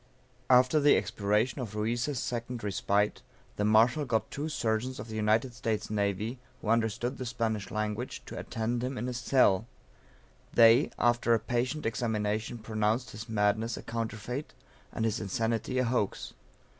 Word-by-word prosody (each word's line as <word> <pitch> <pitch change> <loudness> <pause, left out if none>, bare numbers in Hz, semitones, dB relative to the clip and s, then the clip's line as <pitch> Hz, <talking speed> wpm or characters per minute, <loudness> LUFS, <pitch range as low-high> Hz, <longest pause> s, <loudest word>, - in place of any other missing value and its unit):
After 130 +4 +5
the 145 0 +5
expiration 105 +5 0
of 110 -4 -6
Ruiz' 120 +6 -1
second 120 0 -4
respite, 105 +1 0 0.4
the 105 - 0
Marshal 115 +8 +4
got 115 -5 -1
two 150 +3 -3
surgeons 125 -2 -1
of 110 - -7
the 110 - -6
United 110 +3 +1
States 115 -4 -2
Navy, 105 +3 -1 0.2
who 110 - -5
understood 115 +2 0
the 130 - -3
Spanish 110 -4 -2
language, 110 +3 -3
to - - -8
attend 115 +2 -2
him 130 +1 -3
in - - -3
his 125 -1 -3
cell; 115 -6 +3 0.9
they, 115 +4 +7
after 120 -1 +3
a - - +1
patient 125 +7 -2
examination 110 0 -1
pronounced 110 +2 -1
his 110 +2 -8
madness 110 +1 +1
a - - -8
counterfeit, 115 +4 -4 0.4
and 115 - -2
his 110 +1 0
insanity 115 +5 -1
a 130 - +3
hoax. 115 -4 -1
115 Hz, 155 wpm, -30 LUFS, 110-125 Hz, 0.9 s, they